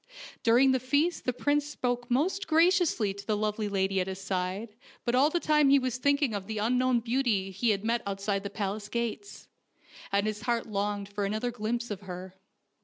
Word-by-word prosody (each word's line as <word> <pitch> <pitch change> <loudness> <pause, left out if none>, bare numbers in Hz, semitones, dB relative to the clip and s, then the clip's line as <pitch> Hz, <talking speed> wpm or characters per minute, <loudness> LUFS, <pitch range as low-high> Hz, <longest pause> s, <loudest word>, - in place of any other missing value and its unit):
During 245 +4 +5
the 260 - +2
feast 285 +7 0
the 250 - +2
prince 290 +4 +1
spoke 245 -4 -3
most 365 +11 0
graciously 325 - +3
to 200 0 -9
the 215 -2 +1
lovely 210 0 -1
lady 195 -1 +1
at 185 - -3
his 190 0 -5
side, 195 +3 -3 0.3
but 240 - 0
all 270 +4 +5
the 345 - 0
time 300 -3 +3
he 280 - +7
was 255 -2 -1
thinking 285 -2 +2
of 200 -2 -4
the 220 -1 -3
un 240 +4 +1
known 255 -2 +2
beauty 230 -5 0
he 225 +5 0
had 200 -1 +1
met 235 0 +1
outside 200 0 -1
the 200 - -5
palace 205 0 -4
gates, 235 - -4 0.6
and 200 +1 +2
his 215 0 -2
heart 235 -1 0
longed 205 -1 -2
for 205 0 -4
another 215 +5 -1
glimpse 235 +1 -3
of 205 -1 -5
her. 185 -1 -8
230 Hz, 200 wpm, -29 LUFS, 200-255 Hz, 0.6 s, he